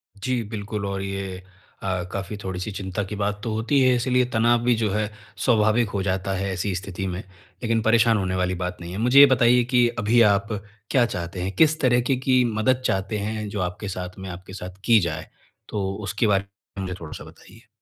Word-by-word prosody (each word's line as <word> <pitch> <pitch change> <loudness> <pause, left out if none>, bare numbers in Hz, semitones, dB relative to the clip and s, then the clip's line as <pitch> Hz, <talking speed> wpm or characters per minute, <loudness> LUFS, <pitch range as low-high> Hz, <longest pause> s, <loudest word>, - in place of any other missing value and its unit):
जी, 125 +4 -1
बिल्कुल 105 -1 -5
और 100 -1 -3
ये 95 -1 -5 0.4
अ, 90 -2 -1
काफ़ी 100 +1 -4
थोड़ी-सी 95 +2 -4
चिंता 95 +1 -3
की 105 - -4
बात 105 0 -1
तो 115 - -2
होती 115 +6 +1
है, 130 -1 +5
इसीलिए 125 +1 +2
तनाव 120 +1 +4
भी 125 0 +4
जो 110 -1 0
है, 105 +1 -1 0.3
स्वाभाविक 110 0 +3
हो 100 -1 -2
जाता 95 0 -1
है 95 +1 -2
ऐसी 95 +2 -2
स्थिति 95 +1 -5
में। 90 -1 -3
लेकिन 110 +4 -4
परेशान 115 0 +4
होने 95 -2 -1
वाली 90 0 0
बात 90 0 -3
नहीं 85 0 -7
है। 95 - -5
मुझे 125 +5 +5
ये 140 - +12
बताइए 120 0 +4
कि 120 -1 +5
अभी 115 +2 +4
आप 100 0 0 0.4
क्या 125 -3 +4
चाहते 90 -4 -5
हैं? 95 +2 -2
किस 155 0 +4
तरीके 125 0 +3
की 130 -1 +4
मदद 125 +4 +2
चाहते 95 +3 0
हैं, 105 +1 -3
जो 100 - -4
आपके 95 +4 -8
साथ 90 -1 -6
में 95 0 -6
आपके 95 +1 -9
साथ 90 0 -8
की 115 -2 +6
जाए? 80 -4 -3 0.4
तो 95 -2 -2
उसके 100 +3 0
बारे 100 -1 +2
में 100 0 -11
मुझे 90 - -4
थोड़ा-सा 80 -2 -8
बताइए। 115 0 -16
100 Hz, 210 wpm, -24 LUFS, 95-115 Hz, 0.4 s, ये